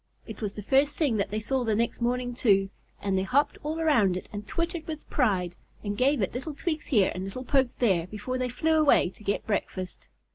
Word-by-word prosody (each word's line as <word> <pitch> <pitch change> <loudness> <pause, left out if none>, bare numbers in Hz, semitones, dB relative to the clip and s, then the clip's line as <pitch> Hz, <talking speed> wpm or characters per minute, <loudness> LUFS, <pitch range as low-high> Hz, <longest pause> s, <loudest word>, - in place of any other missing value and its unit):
It - - -9
was 205 -2 -2
the 210 - -7
first 280 +6 +2
thing 280 -9 +2
that 200 - 0
they 215 - -2
saw 260 +4 0
the 220 -3 +1
next 235 +2 -1
morning, 245 +1 0
too, 195 -5 +3 0.3
and 195 -1 0
they 190 - +2
hopped 260 +10 +1
all 310 +2 -3
around 230 - +3
it - - -7
and 205 0 -6
twittered 335 -1 -3
with 310 -2 -6
pride, 190 - +1 0.3
and 205 -1 -2
gave 260 +1 +2
it 190 - -2
little 275 +5 -5
tweaks 310 0 -3
here 210 -9 +3
and 185 - -4
little 225 +7 -6
pokes 265 -2 +2
there 185 -8 +2
before 215 +6 -4
they 255 0 -1
flew 315 +6 +2
away 285 - +4
to 215 - -17
get 200 0 -1
breakfast. 185 - -3
240 Hz, 225 wpm, -27 LUFS, 200-280 Hz, 0.3 s, away